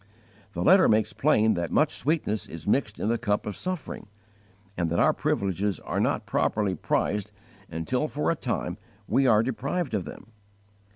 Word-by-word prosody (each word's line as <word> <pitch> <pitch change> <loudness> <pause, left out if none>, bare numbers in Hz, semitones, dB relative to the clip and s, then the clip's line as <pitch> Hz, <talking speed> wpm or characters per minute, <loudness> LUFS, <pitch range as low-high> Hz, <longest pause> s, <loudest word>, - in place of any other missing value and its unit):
The 85 - -2
letter 190 +1 +6
makes 110 0 +2
plain 110 -7 +3
that 85 -1 -2
much - - +2
sweetness 140 -8 -1
is 80 -1 -8
mixed 110 -1 0
in - - -1
the 115 +1 +1
cup 105 -3 0
of 105 - -4
suffering, 180 - -5 0.7
and 85 -2 -1
that 85 - -1
our - - +4
privileges 100 +1 -1
are - - -3
not - - 0
properly 105 -3 0
prized 105 +4 -1 0.4
until 125 - -1
for 150 +1 -1
a - - 0
time 110 - -3 0.3
we 135 0 +3
are 110 -2 +5
deprived 135 +5 -2
of 100 -4 -1
them. - - -10
110 Hz, 170 wpm, -26 LUFS, 100-135 Hz, 0.7 s, letter